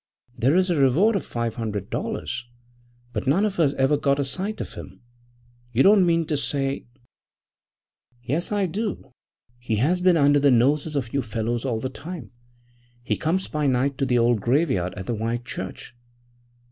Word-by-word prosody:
There 135 +7 +2
is 185 0 +3
a 170 - +1
reward 160 - +4
of 195 - -1
five 115 -1 -3
hundred 105 -4 -4
dollars, 125 0 -3 0.7
but 110 +3 -3
none 180 +10 +3
of 200 -4 -3
us 145 -4 +3
ever 135 +2 +2
got 140 -1 +1
a 140 - 0
sight 190 +10 -4
of - - -6
him. 95 +1 -10 0.7
You 120 - +4
don't 195 -2 +6
mean 165 -1 +2
to 150 -1 -1
say 140 -2 -2 0.6
' 120 0 -42
'Yes, 150 - -2
I 205 -2 +1
do. 200 - -4 0.5
He 120 -2 -2
has 160 +12 +1
been 180 -2 +4
under 145 -1 +4
the 140 0 +4
noses 140 +5 +2
of 125 -5 -2
you 140 - +1
fellows 115 +1 -3
all 120 -4 0
the 130 - -2
time. 150 - -8 0.7
He - - 0
comes 175 +4 -1
by 150 -1 -1
night 130 +1 +1
to 135 - +1
the 125 -1 +2
old 120 -2 +3
graveyard 120 - +1
at 95 - -6
the 120 - -2
White 115 +2 -2
Church.' 130 - -7
140 Hz, 185 wpm, -24 LUFS, 120-165 Hz, 0.7 s, don't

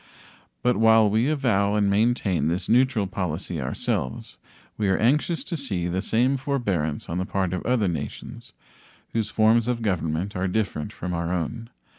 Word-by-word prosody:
But 125 0 +2
while 110 0 +5
we 115 +6 +2
avow 110 -9 +1
and 105 -1 +2
maintain 100 - +1
this 85 +3 -1
neutral 125 -3 +3
policy 90 -5 -3
ourselves, 65 0 -3 0.4
we 105 -2 0
are 95 - +3
anxious 150 +8 +1
to 175 - -4
see 105 - -2
the 90 +2 -1
same 125 +6 +1
forbearance 100 - -2
on 85 - -3
the 90 - -1
part 95 -2 -1
of 90 - -3
other 120 -5 +2
nations 80 -5 -6 0.6
whose 110 -2 0
forms 110 +2 +3
of 120 -2 -1
government 90 -1 -1
are 95 +1 0
different 95 -6 -2
from 90 +1 -5
our 85 0 -2
own. 115 +7 -3
100 Hz, 165 wpm, -24 LUFS, 90-115 Hz, 0.6 s, while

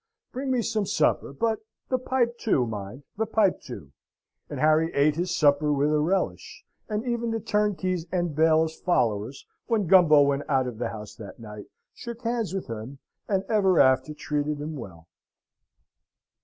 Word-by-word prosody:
Bring 265 +2 -4
me 250 -3 +1
some 215 -3 -1
supper: - - +1
but 220 +10 -1 0.3
the 255 - +1
pipe 240 -2 -1
too, 135 - +1
mind 110 +4 -7
the 220 0 -1
pipe 215 -3 +2
too!" 80 - -10 0.6
And - - -5
Harry 155 +2 +3
ate 145 +1 +3
his 175 +3 -2
supper 150 0 +3
with 145 +1 +1
a 150 - +3
relish: 180 +5 -2 0.2
and 215 +2 -2
even 235 -1 -1
the 225 0 -1
turnkeys 195 -5 -1
and 175 -4 -1
bailiff's 160 0 +2
followers, 120 - 0 0.2
when 225 -4 +1
Gumbo 160 -5 +6
went 140 0 -1
out 135 -2 +2
of 120 -3 -6
the 120 - -2
house 105 -2 -8
that 110 -1 -10
night, 105 -2 -10 0.3
shook 235 0 -9
hands 230 -2 -1
with 195 -1 -4
him, 115 +4 -7 0.3
and 195 -2 +1
ever 195 -5 +3
after 130 +3 +3
treated 150 0 -2
him 155 +2 -5
well. 85 - -10
160 Hz, 170 wpm, -26 LUFS, 135-210 Hz, 0.6 s, Gumbo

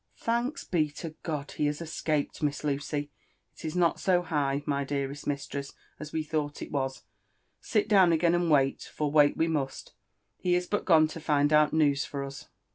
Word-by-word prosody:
<' - - -38
Thanks 240 +7 -1
be 155 -4 +1
to 165 +1 -6
God, 150 -3 -4
he 150 - 0
has 145 0 -2
escaped. 155 -3 -2
Miss 145 -1 -1
Lucy 145 0 -2 0.2
!— - - -27
Il - - -4
is 155 - -4
not 175 -2 +2
so 180 -2 +2
high, 145 -4 0
my 140 -1 0
dearest 140 0 -4
mistress, 140 -1 -4 0.3
as 150 0 -7
we 160 - -1
thought 150 -1 -2
it - - -9
was; 135 -2 -2 0.6
sit 210 -2 0
down 190 -5 +6
again 170 +1 +3
and 175 -1 +1
wait— 135 -3 +3
for 150 -2 -2
wait 145 -1 +5
we 165 - +2
must 145 -5 -3 0.2
— - - -43
^he 180 -1 +3
is 180 - -2
gone 170 -5 +4
to 165 - -7
find 150 -1 +2
out 150 0 +5
news 145 -3 +3
for 140 -1 -5
us." 140 0 -8
150 Hz, 200 wpm, -28 LUFS, 145-165 Hz, 0.6 s, down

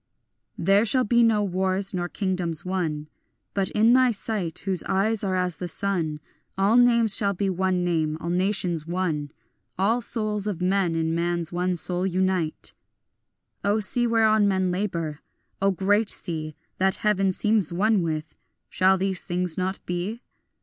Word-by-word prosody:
There 195 +4 +3
shall 255 +3 +3
be 235 +2 +3
no 225 -2 +3
more - - -3
wars 190 +2 0
nor 175 -1 -2
kingdoms 180 -4 -2
won, 165 -5 -2 0.5
But 195 -1 0
in 225 +3 +4
thy 255 0 +5
sight 200 -6 -2
whose 190 -3 +3
eyes 210 +3 +1
are 190 -2 0
as 180 -3 -1
the 180 - -3
sun 165 -4 -1 0.4
All 200 +4 +3
names 235 -3 +4
shall 200 -2 +1
be 195 +1 -1
one 185 0 0
name, 160 -3 0
all 170 +1 -4
nations 180 -3 0
one, 165 -5 -2 0.5
All 220 +6 +2
souls 215 -3 -2
of 200 -5 -3
men 180 -2 +1
in 160 0 0
man's 170 0 -1
one 180 +1 -1
soul 180 +2 -1
unite. 185 -3 -1 0.9
O 205 +2 +2
sea 240 +4 +3
whereon 220 -2 +3
men 190 -2 +1
labour, 170 -6 -3 0.4
O 195 - +3
great 200 +3 +1
sea 155 -3 -5 0.2
That 190 0 +2
heaven 195 -2 +2
seems 210 -2 +1
one 205 +3 +2
with, 155 -2 -3 0.4
shall 190 +1 +3
these 190 -1 -1
things 180 -1 -1
not 185 +1 -2
be? 185 +7 -4
190 Hz, 160 wpm, -25 LUFS, 175-205 Hz, 0.9 s, thy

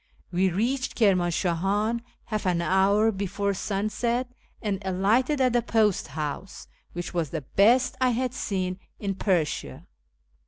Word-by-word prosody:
"We 185 +2 +2
reached 245 +8 -1
Kirmanshahan 195 +2 +1 0.2
half 215 -3 -2
an 175 -2 +2
hour 195 +5 +3
before 200 0 -2
sunset, 215 +6 -1 0.3
and 205 -3 -2
alighted 215 +10 +2
at 255 -2 +3
the 240 - +3
post 220 -4 +1
house, 155 +5 -5 0.3
which 175 +1 -5
was 170 -4 -1
the 160 +1 -3
best 230 - +3
I 255 - +4
had 250 +1 -1
seen 185 -6 -2 0.2
in 200 -2 -2
Persia. 170 - -1
200 Hz, 130 wpm, -26 LUFS, 180-230 Hz, 0.3 s, I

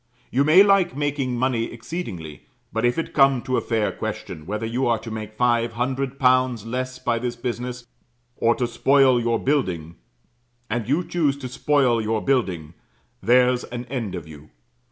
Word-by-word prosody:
You 135 +3 +3
may 160 +7 +7
like 195 -5 +3
making 140 -4 -1
money 120 -2 0
exceedingly; 110 - -7 0.3
but 110 +2 0
if 120 - +1
it 165 - -3
come 135 -3 +4
to 130 - -1
a - - +1
fair 110 -3 0
question, 75 +1 -6
whether 105 +3 -3
you 120 +3 -1
are 115 -1 +2
to 115 +1 -9
make 110 -1 -5
five 120 -1 +2
hundred 130 +3 -2
pounds 130 -4 +2
less 130 +2 -3
by 120 -2 -1
this 120 0 -3
business, 125 0 -5 0.5
or 115 0 +3
to 125 - -1
spoil 130 +1 +3
your 115 0 +1
building, 90 - -1 0.7
and 120 -1 -2
you 155 +6 +2
choose 150 -6 0
to 135 -2 -6
spoil 125 -2 +2
your 110 0 0
building, 95 - -1 0.5
there's 125 +1 +3
an 120 0 -6
end 115 -8 -3
of 85 -3 -7
you. 75 0 -13
125 Hz, 175 wpm, -23 LUFS, 115-135 Hz, 0.7 s, may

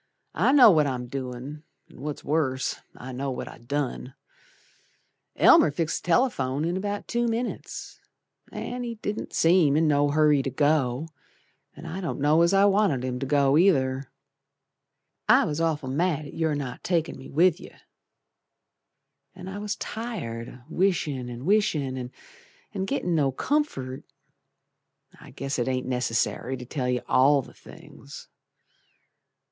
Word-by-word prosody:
I - - +3
know 270 -6 +8
what 155 -4 +3
I'm 125 -2 -3
doin', 130 +2 -6 0.3
An' - - -15
what's 150 0 -5
worse, 140 -4 0 0.2
I 130 - -8
know 135 +2 -3
what 130 - -5
I - - -11
done. 130 0 -4 1.2
Elmer - - +6
fixed 155 +2 -2
th' - - -18
telephone 165 - +1
in 170 +2 -1
about 205 +1 -3
two 240 0 0
minits, 235 +2 -4 0.5
An' 245 +1 -5
he 235 -1 -4
didn't 210 -1 -5
seem 165 -4 +4
in 160 0 +3
no 145 -1 +3
hurry 150 -1 +4
to 135 - -3
go, 145 0 +1 0.7
An' - - -11
I 185 +4 -5
don't 170 - -4
know 150 +3 +4
as 170 +1 +4
I 195 0 +5
wanted 195 -10 +2
him 125 -1 -3
to 135 - -3
go 140 +1 +3
either, 135 -8 +2 1.2
I - - +6
was 150 +2 -2
awful 155 -4 -1
mad 155 +1 0
at - - -10
your 160 -2 0
not 130 -4 -5
takin' 170 -3 0
me 135 - -11
with 170 +3 +3
yer, - - -13 1.6
An' 185 0 -9
I 195 +2 -6
was 205 0 -3
tired 180 - -5
o' - - -13
wishin' 160 -8 0
and 120 +2 -7
wishin' 140 -11 0 0.6
An' 190 -1 -2
gittin' 180 -9 -1
no 145 -4 +2
comfort. 135 - -2 1.2
I - - -13
guess 135 -1 -4
it 120 - 0
ain't 130 -1 -1
necessary 125 +1 -1
to 125 - -9
tell 125 -1 -3
yer 125 -1 -1
all 135 +1 +4
the - - -15
things. 70 - -13
145 Hz, 150 wpm, -26 LUFS, 130-180 Hz, 1.6 s, know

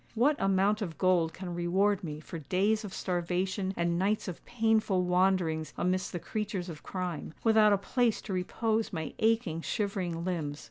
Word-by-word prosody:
What 270 +7 +4
amount 195 +2 +2
of 170 -6 -4
gold 180 -3 +3
can 180 +1 -6
reward 190 +4 +1
me 150 -3 -5
for 160 +1 -7
days 200 +9 +1
of 205 - -6
starvation 185 +2 -1
and 170 0 +1
nights 205 +3 +1
of 180 - -6
painful 220 -5 +2
wanderings 180 -4 +1
amidst 185 0 0
the - - -3
creatures 200 -1 -3
of 155 -3 -8
crime, 180 -4 -4
without 220 -2 +5
a 200 - +5
place 230 +3 +1
to 195 - -4
repose 220 +4 0
my 160 -4 -4
aching, 220 -7 +1
shivering 185 -5 -2
limbs? 155 -5 -2
185 Hz, 170 wpm, -30 LUFS, 170-210 Hz, -, without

